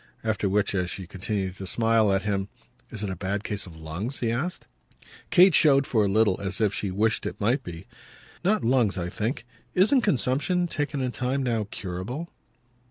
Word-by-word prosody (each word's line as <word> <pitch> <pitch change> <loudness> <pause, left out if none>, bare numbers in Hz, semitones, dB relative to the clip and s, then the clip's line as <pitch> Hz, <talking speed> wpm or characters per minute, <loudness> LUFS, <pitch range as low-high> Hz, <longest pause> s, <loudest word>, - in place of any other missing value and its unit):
After 110 -3 0
which, 100 +1 +1
as 90 -2 0
she 95 +1 -6
continued 95 +1 -3
to 95 - -7
smile 115 0 +3
at 95 0 +1
him, 100 -1 -1 0.4
"Is 105 -2 -6
it 100 - -2
a - - -3
bad 100 +3 -3
case 105 -3 -4
of 80 -3 -12
lungs?" 85 - -5
he 115 -2 -1
asked. 155 +10 -3 0.6
Kate 185 0 +7
showed 140 -3 +5
for 110 -5 +2
a - - +1
little 100 -1 +2
as 100 0 0
if 105 -3 +2
she 100 +1 -2
wished 105 +4 +1
it - - -6
might 125 +6 +1
be. 85 -3 -8 0.6
"Not 210 +4 +2
lungs, 115 -4 +2
I 85 -1 -2
think. 115 - -3 0.3
Isn't 215 +9 +5
consumption, 145 - +1
taken 145 -4 -2
in 125 -1 -1
time, 130 +2 -1
now 115 -4 -1
curable?" 105 - -5
110 Hz, 190 wpm, -26 LUFS, 95-130 Hz, 0.6 s, Kate